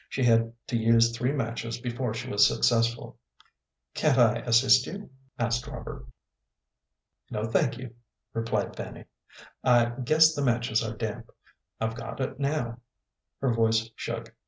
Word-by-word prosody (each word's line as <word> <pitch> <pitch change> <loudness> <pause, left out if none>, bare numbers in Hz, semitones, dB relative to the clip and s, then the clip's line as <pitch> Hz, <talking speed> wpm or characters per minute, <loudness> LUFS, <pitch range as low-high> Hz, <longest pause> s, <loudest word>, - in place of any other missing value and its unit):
She 130 - -2
had 115 -1 +3
to - - -3
use 115 0 +3
three 125 +3 0
matches 115 -3 -3
before 120 -1 -3
she 120 +2 -5
was 105 -4 +5
successful. 115 0 0 0.7
"Can't 150 -4 +2
I 120 -2 +5
assist 120 +2 +4
you?" 200 -2 -8 0.3
asked 120 +2 -1
Robert. 145 - -8 1.2
"No, 105 0 -3
thank 115 +1 +1
you," 125 -2 -9 0.4
replied 115 0 -2
Fanny; - - -8 0.6
"I 120 -1 +4
guess 155 +4 +5
the 145 - -3
matches 120 -3 +1
are 110 0 -5
damp. 110 +1 -5 0.5
I've 110 0 -1
got 115 +1 -7
it 130 0 -3
now." 140 -5 -2 0.6
Her 130 -3 +1
voice 115 0 +1
shook. 115 -1 -6
115 Hz, 140 wpm, -27 LUFS, 115-125 Hz, 1.2 s, was